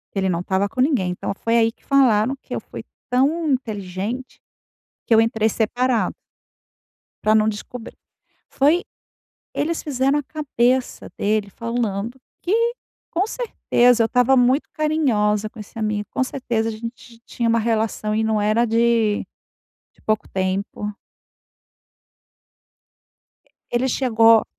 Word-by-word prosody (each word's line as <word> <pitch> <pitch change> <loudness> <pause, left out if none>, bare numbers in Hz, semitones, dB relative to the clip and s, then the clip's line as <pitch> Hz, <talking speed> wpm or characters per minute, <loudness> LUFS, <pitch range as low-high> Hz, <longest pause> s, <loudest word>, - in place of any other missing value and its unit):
que 195 - +1
ele 190 - +1
não 170 - 0
estava 190 +2 0
com 255 - -4
ninguém, 255 - +2
então 180 - -3
foi 230 +3 0
aí 225 0 +3
que - - -34
falaram 260 -3 +3
que - - -7
eu - - -2
fui - - -9 0.3
tão 295 +6 +2
inteligente, 220 0 -3 0.7
que 230 - +4
eu 220 - +7
entrei 225 -1 +2
separado 240 +2 0 1.1
pra 215 - +4
não 215 0 +4
descobrir. 220 +2 -6 0.5
Foi 305 +6 +2 0.7
eles 330 +2 -1
fizeram 275 0 +1
a - - -5
cabeça 260 -4 -1
dele 210 0 0
falando 230 +1 -3 0.2
que, 360 - -1 0.6
com 360 +3 +1
certeza, 245 - +2
eu - - +2
estava 250 +2 +3
muito 255 +4 +3
carinhosa 220 -10 +1
com 230 - -14
esse 210 +2 -9
amigo, 215 -1 -1
com - - +1
certeza 235 -4 -2
a - - -2
gente 230 +1 -9
tinha 235 -1 -1
um - - +3
relação 220 -1 0
e 220 - +1
não 220 -1 +1
era 215 +3 +3
de 230 -2 +2 0.7
de - - -28
pouco 215 0 0
tempo. 195 +2 -2 2.8
Ele 245 +2 +1
chegou 230 -3 +4
230 Hz, 135 wpm, -22 LUFS, 215-260 Hz, 2.8 s, eu